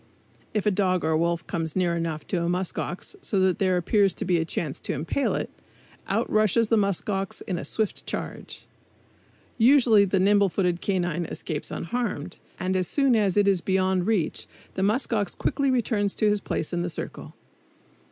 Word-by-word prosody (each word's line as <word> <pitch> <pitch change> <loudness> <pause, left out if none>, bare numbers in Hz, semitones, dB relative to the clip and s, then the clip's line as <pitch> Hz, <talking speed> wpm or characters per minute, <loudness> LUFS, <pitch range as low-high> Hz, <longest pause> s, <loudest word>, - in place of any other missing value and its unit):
If 210 - 0
a 210 - +4
dog 185 -2 +1
or 160 0 +2
wolf 170 0 0
comes 160 -2 -2
near 180 -2 +1
enough 165 -2 -3
to 180 - 0
a 170 - 0
musk 180 +1 -2
ox 180 - -5
so 200 - -1
that 185 -2 +2
there 185 -2 +2
appears 195 +1 +2
to 210 - -4
be 180 -1 +2
a 165 - 0
chance 155 -3 -3
to - - -3
impale 165 - -1
it, - - -3 0.6
out - - 0
rushes 215 +1 +2
the 230 - +4
musk 200 -4 0
ox 195 -2 -2
in 180 -2 -3
a - - -5
swift 220 -2 -2
charge. - - -6 0.9
Usually 235 -4 +6
the 195 0 +1
nimble 200 +1 +4
footed 180 -1 0
canine 175 -3 -1
escapes 155 -1 -5
unharmed, 210 -5 -3 0.2
and 185 +1 -1
as 185 -2 +1
soon 275 -4 +2
as 205 -3 +2
it 205 -1 +4
is 195 -3 +3
beyond 190 0 +1
reach 210 -8 -1 0.3
the - - -3
musk 220 +6 +1
ox 205 -4 -1
quickly 280 -1 0
returns 220 -5 0
to 215 - +2
his 210 0 +2
place 155 - -3
in 175 - 0
the 175 - -2
circle. 160 - -7
190 Hz, 190 wpm, -25 LUFS, 175-210 Hz, 0.9 s, Usually